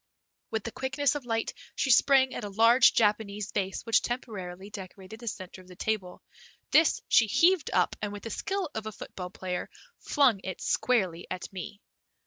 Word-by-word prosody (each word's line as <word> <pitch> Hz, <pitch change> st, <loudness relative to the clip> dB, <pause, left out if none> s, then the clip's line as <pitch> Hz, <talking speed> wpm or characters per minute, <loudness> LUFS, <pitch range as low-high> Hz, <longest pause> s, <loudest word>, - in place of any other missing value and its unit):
With 220 Hz, -2 st, -2 dB
the 230 Hz, -, -5 dB
quickness 265 Hz, +2 st, 0 dB
of 285 Hz, -4 st, -6 dB
light 225 Hz, -1 st, -1 dB, 0.2 s
she 265 Hz, -, +1 dB
sprang 265 Hz, +1 st, +5 dB
at -, -, -5 dB
a 205 Hz, -, -4 dB
large 230 Hz, +5 st, +5 dB
Japanese 210 Hz, -1 st, +1 dB
vase 195 Hz, -2 st, -2 dB
which 230 Hz, -, +3 dB
temporarily 200 Hz, -6 st, -5 dB
decorated 195 Hz, +1 st, -9 dB
the 235 Hz, -, -10 dB
center 185 Hz, -3 st, -6 dB
of 185 Hz, -, -19 dB
the 180 Hz, -, -13 dB
table. 195 Hz, -2 st, -3 dB, 0.5 s
This 315 Hz, +1 st, +4 dB
she 220 Hz, -, +5 dB
heaved 345 Hz, -, +3 dB
up, -, -, +2 dB
and 205 Hz, -1 st, -2 dB
with 205 Hz, 0 st, -8 dB
the 225 Hz, -, -5 dB
skill 385 Hz, -, -3 dB
of 220 Hz, -1 st, -4 dB
a -, -, -4 dB
football 180 Hz, -3 st, -8 dB
player 180 Hz, -1 st, -4 dB, 0.3 s
flung 255 Hz, -9 st, +3 dB
it 185 Hz, -1 st, -5 dB
squarely 185 Hz, -9 st, 0 dB
at 185 Hz, -, -6 dB
me. 195 Hz, +2 st, -7 dB
215 Hz, 180 wpm, -28 LUFS, 190-250 Hz, 0.5 s, sprang